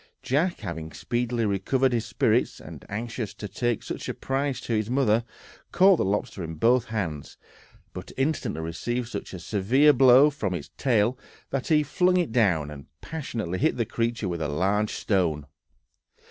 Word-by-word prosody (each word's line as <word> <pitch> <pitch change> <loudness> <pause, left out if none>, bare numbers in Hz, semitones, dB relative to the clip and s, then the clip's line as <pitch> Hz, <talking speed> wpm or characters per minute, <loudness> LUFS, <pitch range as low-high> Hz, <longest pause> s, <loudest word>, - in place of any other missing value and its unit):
Jack, 165 +7 0
having 80 -2 -5
speedily 120 -1 -1
recovered 125 +6 +1
his 115 0 -1
spirits, 120 0 +1
and - - -11
anxious 115 0 -4
to 105 - -6
take 120 +4 -1
such - - -5
a - - -3
prize 135 0 -2
to 115 - -3
his 110 0 0
mother, 120 -3 +2 0.5
caught 190 0 +6
the - - +1
lobster 100 -1 -2
in 80 0 -5
both 120 +8 +3
hands, 90 - -4 0.6
but - - -8
instantly 135 - -1
received 120 +9 -3
such - - -6
a 95 - -6
severe 115 - +3
blow 135 +3 +7
from 105 -11 -3
its 75 - -7
tail 120 0 +1 0.3
that 135 -1 -2
he 155 -2 +4
flung 180 +5 +2
it 175 -8 0
down, 90 -11 +2
and 70 -2 -10
passionately 115 - -4
hit 155 +1 +1
the 115 - 0
creature 115 -1 -2
with 85 -2 -3
a 75 - 0
large 100 +8 +1
stone. 85 -8 0
115 Hz, 170 wpm, -26 LUFS, 95-130 Hz, 0.6 s, blow